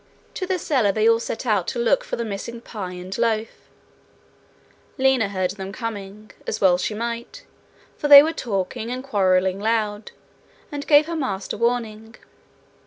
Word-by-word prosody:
To 370 - -4
the 375 -1 0
cellar 260 - +1
they 215 +2 +1
all 230 0 +4
set 235 +2 -5
out 205 -6 +1
to - - -3
look 235 +3 +2
for - - -4
the 235 - -3
missing 220 +3 -6
pie 205 -6 -7
and 180 +1 -7
loaf. 225 -1 -2 1.3
Lina 260 -5 +2
heard 185 -2 -1
them 195 -1 -7
coming, 210 -2 -7 0.2
as 215 - -2
well 180 -2 +4
she 210 - -2
might, 235 - -5 0.5
for 295 - -2
they 285 -1 +11
were 320 +2 -1
talking 220 - -3
and 255 +1 -4
quarrelling 190 -6 +1
loud, 215 -1 -1 0.6
and 290 0 -6
gave 295 0 +6
her 335 +1 -4
master 200 -11 -3
warning. 225 -1 -2
225 Hz, 165 wpm, -22 LUFS, 200-245 Hz, 1.3 s, they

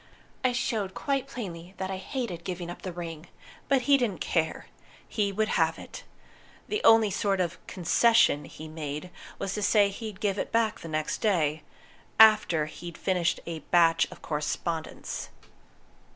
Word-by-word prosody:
I 255 - +3
showed 225 -5 -2
quite 275 -2 -1
plainly 185 -8 -7
that 190 0 -3
I 190 - -3
hated 190 -4 -4
giving 175 -1 -4
up - - -10
the 185 - -5
ring. 170 -1 -7 0.4
But 270 -3 +3
he 280 +1 +5
didn't 220 -8 -1
care. 160 -2 -1 0.4
He 205 -3 0
would 215 +2 0
have 160 -1 +2
it. - - -10 0.6
The 425 +2 -2
only 225 -2 +6
sort 195 0 0
of 175 -1 -1
'concession' 185 -3 +3
he 155 - -10
made 155 +2 -6 0.3
was 195 - -3
to 210 - -3
say 205 0 +4
he'd 210 -1 -7
give 205 -2 0
it - - -3
back 225 -2 +1
next 155 -2 -2
day 160 -8 +1 0.6
after 215 -8 +6
he'd 170 +2 -9
finished 180 -3 0
a 165 -1 -5
batch 165 +1 +3
of - - -13
correspondence. 160 +2 -3
185 Hz, 155 wpm, -28 LUFS, 165-220 Hz, 0.6 s, only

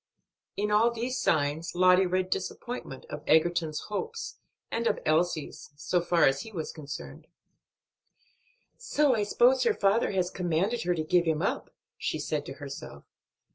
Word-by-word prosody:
In 210 +1 0
all 215 +3 +5
these 240 +2 -3
signs 155 +2 0
Lottie 185 +1 +5
read 185 +1 -1
disappointment 190 - -4
of 150 - -5
Egerton's 160 -1 +2
hopes, 450 - -5 0.3
and 230 0 0
of - - +1
Elsie's, 155 0 0
so 175 +4 0
far 175 0 +2
as 135 0 +2
he 225 - -9
was 165 -6 -4
concerned. 155 +2 -8 1.5
"So 300 - +2
I 215 - 0
suppose 245 +5 +4
her 455 -2 +2
father 200 +4 +2
has 185 -1 0
commanded 180 +6 0
her 175 0 +1
to 160 - -2
give 175 +2 +2
him 160 0 0
up," - - -1 0.3
she - - -2
said - - -3
to - - -5
herself. - - -9
180 Hz, 155 wpm, -28 LUFS, 160-220 Hz, 1.5 s, all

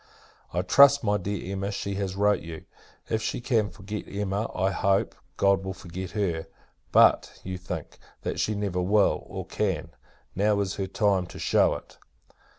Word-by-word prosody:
I - - -1
trust, 140 0 +6
my 105 -1 +2
dear 95 0 -4
Emma, 100 +1 -2
she 100 0 -3
has 95 -1 -3
wrote 105 +1 +3
you. 80 -1 -8 0.4
If 110 - -1
she - - -2
can 115 -4 +1
forget 105 +1 -7
Emma, 100 +2 -2
I 95 +1 +1
hope, 95 0 +1 0.2
God 100 -1 +3
will 95 -1 -4
forget 95 0 -7
her! 85 -6 -1 0.4
But, - - +4
you 95 0 -5
think, 90 -3 -6 0.2
that - - -3
she 105 - 0
never 100 -3 -1
will, 100 +3 +3
or - - -6
can. - - -2 0.4
Now 105 +1 +2
is 95 -2 -3
her 95 -1 -2
time 95 -2 +1
to - - -11
shew - - +3
it. - - -11
100 Hz, 170 wpm, -27 LUFS, 95-105 Hz, 0.4 s, trust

